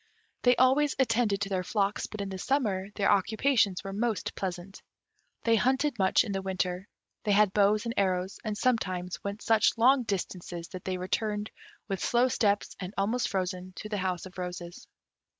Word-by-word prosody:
They 245 Hz, 0 st, +5 dB
always 265 Hz, +4 st, +3 dB
attended 225 Hz, -5 st, +2 dB
to 200 Hz, -, -1 dB
their 185 Hz, -2 st, -1 dB
flocks, 200 Hz, +1 st, -1 dB
but 215 Hz, -, -6 dB
in 200 Hz, -, -4 dB
the 190 Hz, -1 st, -6 dB
summer 205 Hz, -7 st, 0 dB
their 200 Hz, -, +2 dB
occupations 205 Hz, 0 st, +2 dB
were 195 Hz, -1 st, -5 dB
most 215 Hz, -3 st, -1 dB
pleasant. 185 Hz, +1 st, -5 dB, 0.6 s
They 230 Hz, -1 st, +4 dB
hunted 260 Hz, +2 st, +1 dB
much 190 Hz, -1 st, +4 dB
in 215 Hz, -, -5 dB
the 195 Hz, -1 st, -2 dB
winter; 185 Hz, 0 st, -2 dB, 0.4 s
they 210 Hz, -, +2 dB
had 205 Hz, -1 st, +4 dB
bows 210 Hz, +2 st, +3 dB
and 230 Hz, -, -2 dB
arrows, 185 Hz, -1 st, 0 dB
and 210 Hz, -1 st, -3 dB
sometimes 185 Hz, -7 st, -1 dB
went 200 Hz, +1 st, -5 dB
such 225 Hz, +1 st, +3 dB
long 255 Hz, +4 st, +5 dB
distances 180 Hz, -5 st, -4 dB
that 185 Hz, -2 st, -9 dB
they 185 Hz, -1 st, -2 dB
returned, 210 Hz, +3 st, -2 dB, 0.4 s
with 195 Hz, -3 st, -3 dB
slow 245 Hz, +2 st, +3 dB
steps 205 Hz, -4 st, +1 dB
and 185 Hz, +2 st, -6 dB
almost 220 Hz, +5 st, 0 dB
frozen, 185 Hz, -1 st, -3 dB
to 215 Hz, -, -7 dB
the 210 Hz, -, -2 dB
house 185 Hz, -2 st, -2 dB
of 185 Hz, 0 st, -10 dB
roses. 175 Hz, -1 st, -6 dB
200 Hz, 180 wpm, -29 LUFS, 185-225 Hz, 0.6 s, They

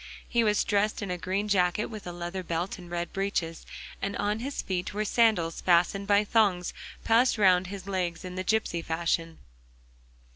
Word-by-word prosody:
He 235 Hz, -1 st, +2 dB
was 210 Hz, -1 st, +2 dB
dressed 210 Hz, +1 st, 0 dB
in 195 Hz, -, -3 dB
a 180 Hz, -, -2 dB
green 195 Hz, +4 st, -1 dB
jacket 190 Hz, 0 st, +2 dB
with 215 Hz, -4 st, -8 dB
a -, -, -4 dB
leather 175 Hz, +2 st, -5 dB
belt 175 Hz, +2 st, -3 dB
and 175 Hz, -1 st, -11 dB
red 175 Hz, -1 st, -4 dB
breeches, 195 Hz, -4 st, -2 dB, 0.3 s
and 200 Hz, 0 st, -2 dB
on 210 Hz, +1 st, 0 dB
his 275 Hz, +4 st, -4 dB
feet 185 Hz, +1 st, -3 dB
were 215 Hz, +1 st, 0 dB
sandals 210 Hz, -8 st, +2 dB
fastened 180 Hz, +3 st, +2 dB
by 205 Hz, 0 st, +4 dB
thongs 200 Hz, -5 st, +2 dB, 0.3 s
passed 230 Hz, +2 st, +4 dB
round 185 Hz, -3 st, +4 dB
his 195 Hz, -1 st, -7 dB
legs 180 Hz, -3 st, -2 dB
in 180 Hz, -, -6 dB
the 185 Hz, -, -3 dB
gipsy 200 Hz, -4 st, 0 dB
fashion. 165 Hz, 0 st, -1 dB
190 Hz, 180 wpm, -28 LUFS, 175-210 Hz, 0.3 s, by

